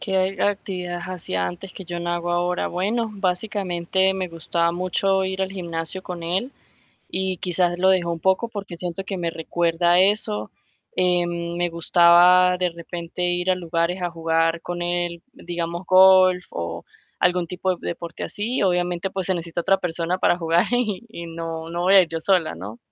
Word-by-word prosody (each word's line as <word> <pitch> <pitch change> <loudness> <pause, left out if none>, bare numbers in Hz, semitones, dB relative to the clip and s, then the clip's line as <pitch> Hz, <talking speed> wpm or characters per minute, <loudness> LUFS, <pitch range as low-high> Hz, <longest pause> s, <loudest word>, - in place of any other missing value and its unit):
¿Qué 190 -1 0
actividades 180 -3 -2
hacía 95 - -2
antes 90 - -7
que 190 - -9
yo 175 0 -5
no 175 0 -2
hago 175 0 -2
ahora? 175 +1 0
Bueno, 215 +6 -1
básicamente 190 -1 0
me 185 -1 -3
gustaba 170 0 -1
mucho 190 +2 +1
ir 190 0 -3
al 190 - -2
gimnasio 170 -1 -4
con 175 -2 -7
él 190 +10 -2 0.6
y 190 0 -2
quizás 175 0 0
lo 190 +1 +3
dejé 185 -2 +2
un 170 -1 -2
poco 190 +6 +2
porque 200 -6 -7
siento 180 +2 -4
que 195 0 -4
me 170 -2 -2
recuerda 170 +1 0
a 175 - +5
eso, 185 - +1 0.5
eh, 180 -1 +2
me 170 0 -2
gustaba 175 +2 +5
de 180 -1 +1
repente 170 +1 -7
ir 175 +1 +1
a - - +4
lugares 175 +1 -1
a 175 - -1
jugar 165 0 0
con 175 0 -4
él, 175 -1 -2
digamos 175 -5 -5
golf 185 -1 +6
o 85 0 -5 0.4
algún 180 -1 +2
tipo 180 +2 -2
de - - -7
deporte 170 0 -5
así, 225 +5 -2
obviamente, 180 0 0
pues 190 -2 -3
se 190 - +1
necesita 170 0 -3
otra 195 +3 +3
persona 175 +1 -2
para 175 - +2
jugar 170 +1 +2
y, 235 -4 0
y 170 -6 -8
no 165 0 -6
no 170 +1 -2
voy 190 +2 +4
a 195 - +9
ir 175 - -3
yo 165 - -3
sola, 180 - +2
¿no? 100 +7 -8
175 Hz, 185 wpm, -23 LUFS, 170-190 Hz, 0.6 s, a